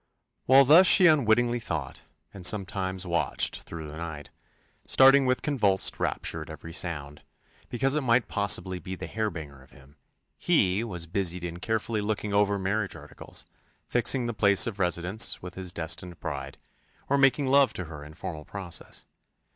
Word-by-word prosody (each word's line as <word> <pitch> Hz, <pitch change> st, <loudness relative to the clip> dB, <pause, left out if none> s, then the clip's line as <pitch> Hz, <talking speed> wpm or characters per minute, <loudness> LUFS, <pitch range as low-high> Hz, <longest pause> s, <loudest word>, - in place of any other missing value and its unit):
While 135 Hz, +1 st, +6 dB
thus 165 Hz, +7 st, +7 dB
she 185 Hz, -, +7 dB
unwittingly 120 Hz, -6 st, +3 dB
thought, 75 Hz, -, -5 dB, 0.3 s
and 100 Hz, -, -11 dB
sometimes 95 Hz, -1 st, +1 dB
watched 85 Hz, -5 st, 0 dB
through 80 Hz, -2 st, -9 dB
the 75 Hz, +1 st, -9 dB
night, 80 Hz, -4 st, -8 dB, 0.6 s
starting 135 Hz, 0 st, +5 dB
with 125 Hz, 0 st, 0 dB
convulsed 105 Hz, -10 st, +1 dB
rapture -, -, -2 dB
at -, -, -10 dB
every 80 Hz, -, -10 dB
sound, 75 Hz, -5 st, -5 dB, 0.5 s
because 135 Hz, +3 st, 0 dB
it 150 Hz, -, 0 dB
might 120 Hz, -2 st, +1 dB
possibly 95 Hz, -3 st, +1 dB
be 95 Hz, +3 st, -7 dB
the -, -, -8 dB
harbinger 80 Hz, -11 st, -5 dB
of 65 Hz, -, -20 dB
him, 70 Hz, +2 st, -20 dB, 0.4 s
he 105 Hz, -, +1 dB
was 90 Hz, -7 st, -5 dB
busied 90 Hz, 0 st, -2 dB
in 85 Hz, 0 st, -7 dB
carefully 110 Hz, +1 st, -2 dB
looking 105 Hz, 0 st, -3 dB
over 100 Hz, 0 st, +2 dB
marriage 95 Hz, +1 st, -2 dB
articles, -, -, -12 dB, 0.4 s
fixing 120 Hz, +1 st, +1 dB
the 120 Hz, -, -3 dB
place 100 Hz, -2 st, +4 dB
of 105 Hz, -4 st, -5 dB
residence 90 Hz, +4 st, 0 dB
with 90 Hz, -1 st, -8 dB
his 90 Hz, -1 st, -6 dB
destined 85 Hz, +1 st, -5 dB
bride, 70 Hz, -3 st, -6 dB, 0.5 s
or 140 Hz, -, +1 dB
making 135 Hz, +1 st, +3 dB
love 135 Hz, -2 st, +4 dB
to 90 Hz, -, -4 dB
her 75 Hz, -2 st, -10 dB
in 75 Hz, +1 st, -13 dB
formal 80 Hz, -2 st, -7 dB
process. 95 Hz, 0 st, -6 dB
95 Hz, 165 wpm, -26 LUFS, 85-120 Hz, 0.6 s, thus